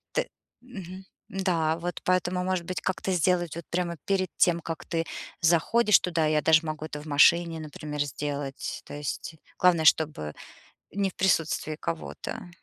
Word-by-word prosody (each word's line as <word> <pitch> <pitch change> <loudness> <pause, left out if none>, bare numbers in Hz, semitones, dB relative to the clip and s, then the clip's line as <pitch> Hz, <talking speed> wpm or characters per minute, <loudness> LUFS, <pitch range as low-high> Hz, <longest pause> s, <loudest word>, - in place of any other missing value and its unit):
Т - - +1 0.3
мгм. 190 -7 -9 0.3
Да, 175 -5 +1
вот 175 +1 -4
поэтому, 180 0 +1
может 185 -2 -1
быть, 185 +1 -3
как-то 190 0 -2
сделать 175 -1 +1
вот 170 - -7
прямо 170 -1 -1
перед 190 -2 +1
тем, 170 -1 +3
как 165 -1 -6
ты 165 -1 -1 0.4
заходишь 180 +6 +4
туда, 165 -3 0
я 155 0 +2
даже 160 +1 +4
могу 155 0 -4
это 150 -1 -6
в - - -12
машине, 165 +3 +4
например, 150 -1 -5
сделать. 145 0 -4
То - - -10
есть 145 +2 -5 0.2
главное, 175 -3 +4
чтобы 150 - +3 0.6
не 200 -1 0
в - - -17
присутствии 165 -4 +1
кого-то. 80 - -5
170 Hz, 155 wpm, -27 LUFS, 155-185 Hz, 0.6 s, заходишь